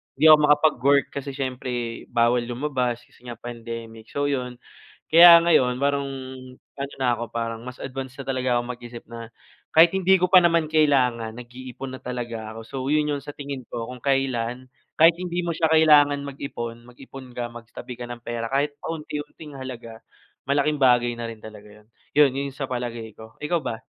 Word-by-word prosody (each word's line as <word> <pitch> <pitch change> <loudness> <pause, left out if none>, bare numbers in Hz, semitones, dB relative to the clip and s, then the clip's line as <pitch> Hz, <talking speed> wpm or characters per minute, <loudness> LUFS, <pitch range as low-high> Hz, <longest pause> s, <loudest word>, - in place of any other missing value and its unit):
hindi 155 +3 +5
ako 155 - +9
makapag-work 145 -2 +3
kasi 140 0 -6
siyempre 125 -3 -4
bawal 120 0 +2
lumabas 125 -2 -2
kasi - - -24
nga 120 - -6
pandemic, 115 -1 -8
so 145 0 -2
yun. 125 -2 -3 0.5
Kaya 170 +1 +9
ngayon 130 -7 +3
parang 140 0 0 0.7
ano 140 0 -5
na 130 -2 0
ako, 120 0 -6
parang 115 -1 -4
mas 125 0 -9
advance 135 0 -7
na 135 - -6
talaga 130 -2 0
ako - - -1
mag-isip 120 -1 -11
na 115 -1 -9 0.4
kahit 165 +1 +8
hindi 190 0 +3
ko 180 - +2
pa 185 - +9
naman 170 -3 +2
kailangan, 125 -7 +2
nag-iipon 125 +2 -9
na - - -25
talaga 115 -3 -5
ako. 115 - -8
So, 115 +4 -10 0.2
yun 150 -1 +1
yung 145 - -1
sa 145 0 -9
tingin 140 -3 -7
ko 115 +1 -6
kung 125 - -8
kailan, 130 -2 -1 0.2
kahit 165 +2 +5
hindi 180 -1 -3
mo 170 - -2
siya 165 0 +1
kailangan 145 -3 +5
mag-ipon, 120 -4 -7
mag-ipon 130 0 -12
ka, 120 -1 -4
magtabi 120 +1 -10
ka 120 - -6
ng 120 -1 -9
pera, 115 -1 -4
kahit 145 +3 -1
pa 165 - -4
unti-unting 150 -1 -8
halaga, 120 -3 -8 0.5
malaking 145 +2 +1
bagay 120 -2 +4
na 115 - -4
rin 115 -1 -9
talaga 105 -1 -11
yun. - - -31 0.3
Yun 145 -3 +6
yun 140 -1 -4
sa 135 -3 -5
palagay 120 -2 -4
ko. 110 0 -12
Ikaw 170 +3 0
ba? 115 -4 -6
130 Hz, 185 wpm, -24 LUFS, 120-145 Hz, 0.7 s, ako